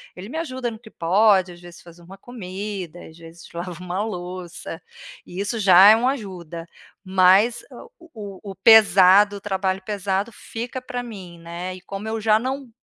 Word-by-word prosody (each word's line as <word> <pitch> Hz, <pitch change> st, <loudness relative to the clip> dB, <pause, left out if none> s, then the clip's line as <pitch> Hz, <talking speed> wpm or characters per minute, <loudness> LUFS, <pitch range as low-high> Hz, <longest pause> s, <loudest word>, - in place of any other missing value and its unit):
ele 185 Hz, +3 st, -9 dB
me 320 Hz, -, -6 dB
ajuda 260 Hz, -7 st, -3 dB
no 220 Hz, -, -10 dB
que 225 Hz, -2 st, -15 dB
pode, 190 Hz, +1 st, +3 dB
às 175 Hz, -, -16 dB
vezes 175 Hz, -1 st, -13 dB
fazer 170 Hz, 0 st, -16 dB
uma 190 Hz, +3 st, -13 dB
comida, 195 Hz, -5 st, -7 dB
às 160 Hz, -, -16 dB
vezes 165 Hz, 0 st, -14 dB
lava 175 Hz, 0 st, -6 dB
uma 180 Hz, +3 st, -3 dB
louça, 180 Hz, -4 st, -7 dB, 0.4 s
e 180 Hz, +2 st, -9 dB
isso 205 Hz, +3 st, -2 dB
já 190 Hz, 0 st, +8 dB
é 220 Hz, -, +8 dB
uma 250 Hz, +3 st, +1 dB
ajuda, 175 Hz, -, -7 dB, 0.4 s
mas, 190 Hz, +5 st, +3 dB
ah, -, -, -11 dB
o 340 Hz, 0 st, -18 dB, 0.3 s
o 200 Hz, -, -8 dB
o -, -, -11 dB
pesado, 200 Hz, -1 st, +6 dB
o -, -, -12 dB
trabalho 190 Hz, -1 st, -2 dB
pesado 200 Hz, +1 st, -2 dB
fica 245 Hz, +3 st, -7 dB
para 250 Hz, -1 st, -5 dB
mim, 185 Hz, -7 st, -10 dB
né, 175 Hz, +2 st, -7 dB
e 185 Hz, -, -13 dB
como 195 Hz, +3 st, -7 dB
eu 225 Hz, 0 st, -3 dB
já 215 Hz, 0 st, +3 dB
não 265 Hz, +1 st, -4 dB
195 Hz, 185 wpm, -22 LUFS, 180-220 Hz, 0.4 s, já